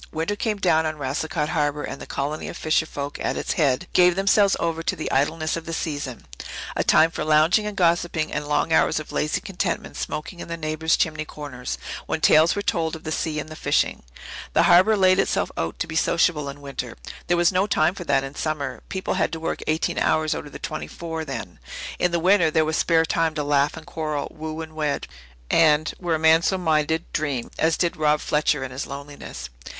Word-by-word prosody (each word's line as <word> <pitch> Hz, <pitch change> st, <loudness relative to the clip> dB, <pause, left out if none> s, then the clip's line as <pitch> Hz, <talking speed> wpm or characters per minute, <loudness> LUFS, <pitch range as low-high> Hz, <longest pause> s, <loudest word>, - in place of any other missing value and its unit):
Winter 165 Hz, +6 st, -2 dB
came 215 Hz, 0 st, -1 dB
down 160 Hz, -5 st, +2 dB
on 155 Hz, 0 st, -4 dB
Racicot 150 Hz, +2 st, -2 dB
Harbour, 150 Hz, -2 st, 0 dB
and 135 Hz, -, -6 dB
the -, -, -8 dB
colony 145 Hz, +3 st, -3 dB
of -, -, -6 dB
fisher 160 Hz, 0 st, +1 dB
folk 145 Hz, -1 st, -5 dB
at -, -, -1 dB
its -, -, -1 dB
head 145 Hz, -2 st, +1 dB
gave 180 Hz, -1 st, +5 dB
themselves 200 Hz, +1 st, +4 dB
over 165 Hz, -1 st, -1 dB
to -, -, -1 dB
the 155 Hz, -, -4 dB
idleness 155 Hz, +3 st, +1 dB
of 165 Hz, -1 st, -6 dB
the 165 Hz, -, -4 dB
season 145 Hz, -6 st, -4 dB, 0.5 s
a -, -, +1 dB
time 160 Hz, +1 st, +5 dB
for -, -, -3 dB
lounging 155 Hz, +7 st, +4 dB
and 210 Hz, -1 st, -6 dB
gossipping 170 Hz, -2 st, +1 dB
and 145 Hz, -, -3 dB
long 150 Hz, +2 st, +1 dB
hours -, -, +3 dB
of 155 Hz, -, -9 dB
lazy 150 Hz, -, 0 dB
contentment 185 Hz, -2 st, -3 dB
smoking 170 Hz, +4 st, -5 dB
in -, -, -7 dB
the 170 Hz, 0 st, -4 dB
neighbours' 155 Hz, 0 st, 0 dB
chimney 155 Hz, -1 st, 0 dB
corners, 130 Hz, -, -6 dB, 0.3 s
when -, -, -1 dB
tales 160 Hz, +2 st, +5 dB
were 205 Hz, -, -2 dB
told 165 Hz, -4 st, 0 dB
of 160 Hz, -, -10 dB
the 155 Hz, -, -4 dB
sea 155 Hz, -1 st, -1 dB
and 155 Hz, -, -6 dB
the 155 Hz, -, -8 dB
fishing. -, -, 0 dB, 0.5 s
The -, -, +4 dB
Harbour 190 Hz, +5 st, +6 dB
laid 185 Hz, -1 st, +4 dB
itself -, -, +1 dB
out 80 Hz, 0 st, -3 dB
to -, -, -1 dB
be 160 Hz, -1 st, -7 dB
sociable 160 Hz, -2 st, +2 dB
in 140 Hz, +1 st, -9 dB
winter. 135 Hz, -4 st, -6 dB, 0.3 s
There 175 Hz, -1 st, +2 dB
was 175 Hz, +1 st, +4 dB
no 190 Hz, +2 st, +2 dB
time 160 Hz, -3 st, +2 dB
for 185 Hz, -, -7 dB
that 140 Hz, -2 st, +2 dB
in 135 Hz, 0 st, -6 dB
summer. 145 Hz, -6 st, -3 dB
People 190 Hz, -1 st, -2 dB
had -, -, 0 dB
to 165 Hz, -, -3 dB
work 165 Hz, -, -3 dB
eighteen 155 Hz, +1 st, 0 dB
hours 155 Hz, -1 st, +2 dB
out -, -, -5 dB
of -, -, -12 dB
the -, -, -7 dB
twenty -, -, -5 dB
four 165 Hz, -1 st, -5 dB
then. -, -, -6 dB, 0.4 s
In 180 Hz, -, +3 dB
the 170 Hz, -, 0 dB
winter 180 Hz, -1 st, +4 dB
there 155 Hz, 0 st, +2 dB
was 160 Hz, +1 st, -1 dB
spare 165 Hz, 0 st, +3 dB
time 165 Hz, -1 st, 0 dB
to 150 Hz, -, -1 dB
laugh 145 Hz, +1 st, +2 dB
and 160 Hz, -, -10 dB
quarrel, 155 Hz, -3 st, -3 dB
woo 155 Hz, 0 st, -5 dB
and 160 Hz, -1 st, -8 dB
wed 150 Hz, -2 st, -1 dB, 0.5 s
and 155 Hz, -1 st, +4 dB
were 175 Hz, -3 st, 0 dB
a -, -, 0 dB
man 160 Hz, +1 st, +5 dB
so 190 Hz, +3 st, +1 dB
minded 160 Hz, -1 st, +1 dB
dream, 140 Hz, -6 st, -2 dB
as 160 Hz, 0 st, +2 dB
did 175 Hz, -2 st, 0 dB
Rob 150 Hz, -1 st, +3 dB
Fletcher 150 Hz, -2 st, +1 dB
in 130 Hz, -, -5 dB
his 130 Hz, +2 st, -5 dB
loneliness. 140 Hz, -, -8 dB
160 Hz, 220 wpm, -24 LUFS, 150-170 Hz, 0.5 s, Harbour